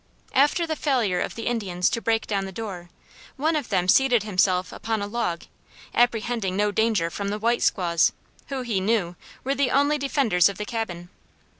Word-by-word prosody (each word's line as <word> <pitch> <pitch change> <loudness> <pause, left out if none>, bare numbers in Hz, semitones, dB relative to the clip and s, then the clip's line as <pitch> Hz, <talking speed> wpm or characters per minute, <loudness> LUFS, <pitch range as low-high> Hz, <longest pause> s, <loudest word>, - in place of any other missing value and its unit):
After 295 +5 +3
the 320 -1 -2
failure 240 -12 +1
of - - -3
the 230 - -6
Indians 190 -7 0
to 230 - -2
break 225 0 0
down 200 -2 -1
the 190 - -7
door, 190 -4 -7 0.5
one 315 +4 +1
of 295 -5 -2
them 180 -3 +1
seated 245 +1 +4
himself 185 -3 +1
upon 225 -1 -3
a 200 - -2
log, 205 -6 -2 0.5
apprehending 230 -4 +1
no 210 0 +2
danger 210 -6 +1
from 200 +3 -4
the 205 +1 -2
"white 235 +3 +1
squaws" 170 -4 +2 0.4
who, 270 -3 -4
he 225 -5 -1
knew, 195 -4 0 0.3
were 270 - 0
the 280 -2 +1
only 285 +3 +2
defenders 250 - +3
of 200 - -7
the 210 - -4
cabin. 180 -7 -5
220 Hz, 185 wpm, -24 LUFS, 185-245 Hz, 0.5 s, seated